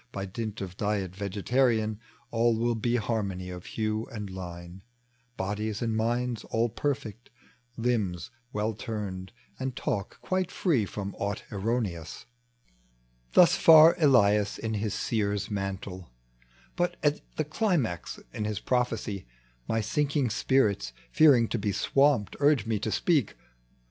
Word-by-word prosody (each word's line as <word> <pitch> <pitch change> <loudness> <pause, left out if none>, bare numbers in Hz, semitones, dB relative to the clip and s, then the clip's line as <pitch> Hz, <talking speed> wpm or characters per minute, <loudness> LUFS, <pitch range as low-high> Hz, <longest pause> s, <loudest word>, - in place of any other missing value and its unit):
By 100 -3 -4
dint 105 +2 -5
of 95 -1 -6
diet 100 -3 -1
vegetarian 110 +2 +1 0.3
All 115 0 +2
will 120 +1 +1
be 120 +2 0
harmony 100 -6 -2
of 90 -1 -8
hue 110 0 -2
and 105 -4 -6
line, 90 0 -8 0.6
Bodies 105 +2 -2
and 115 -2 -1
minds 120 +1 -1
all 115 +1 0
perfect, 125 -3 -3 0.5
limbs 115 -4 -1 0.2
well 105 +1 -1
turned, 100 -4 -5 0.3
And 130 -1 -3
talk 100 -1 -3
quite 185 -1 -1
free 135 - +1
from 100 0 -5
aught 100 +1 -2
e 105 -2 -1 1.4
Thus 180 -2 +7
far 160 0 +8
Elias 105 -8 +4
in 110 -1 -3
his 105 -1 -2
seer's 105 -1 -1
mantle; 95 -2 -4 0.7
But 175 0 0
at 150 0 +2
this 155 - -2
climax 155 - -1
in 105 - -3
his 105 -2 -2
prophecy 115 - -1 0.4
My 115 - +1
sinking 140 +3 0
spirita, 105 - +1 0.2
fearing 130 - +6
to - - -1
be 105 - 0
swamped, 135 +1 +2
Urge 145 -3 +3
me 110 -2 0
to 110 - -2
speak. 150 - +1
110 Hz, 135 wpm, -28 LUFS, 100-125 Hz, 1.4 s, far